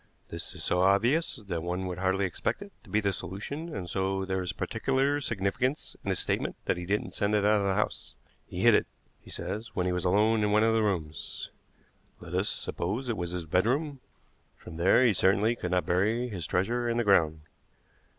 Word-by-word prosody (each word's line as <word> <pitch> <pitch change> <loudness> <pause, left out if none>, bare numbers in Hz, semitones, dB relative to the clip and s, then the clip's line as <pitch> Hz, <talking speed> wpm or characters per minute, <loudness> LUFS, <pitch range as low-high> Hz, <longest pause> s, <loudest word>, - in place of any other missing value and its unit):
This - - -7
is - - -6
so 90 - +1
obvious 115 - +3
that 100 - -4
one 90 +2 -2
would 90 -1 -4
hardly 95 +1 +1
expect 95 - -2
it 200 - -13
to - - -17
be 110 - +2
the 100 -1 0
solution, 140 - -5
and 90 -3 -4
so 95 +1 -1
there 95 0 -1
is 90 - -2
particular 140 +2 0
significance 115 +4 -1
in - - -3
his - - +1
statement - - -1
that - - +1
he 90 0 -6
didn't 105 +2 -1
send 105 +1 +1
it 105 -1 +2
out 105 0 +4
of 100 - 0
the 95 - +1
house. 105 - -2 0.3
He - - -5
hid - - +6
it, - - +3 0.3
he - - -17
says, 110 +2 -5
when 90 - 0
he 90 - +1
was 90 0 -1
alone 105 +4 +3
in 105 - +2
one 105 +1 +4
of 115 0 +3
the 115 - +3
rooms. 85 -7 -3 0.7
Let - - -10
us - - +1
suppose 110 +9 -2
it 115 - 0
was 85 -1 -2
his 90 -1 -4
bedroom. 130 - +1 0.6
From 80 - -10
there 95 +9 +5
he 115 - +5
certainly 100 +5 +3
could 90 - -4
not 90 0 +1
bury 110 +8 +1
his 90 -8 -5
treasure 120 +6 0
in 115 - 0
the 120 - +2
ground. 80 -7 +3
100 Hz, 215 wpm, -29 LUFS, 90-115 Hz, 0.7 s, hid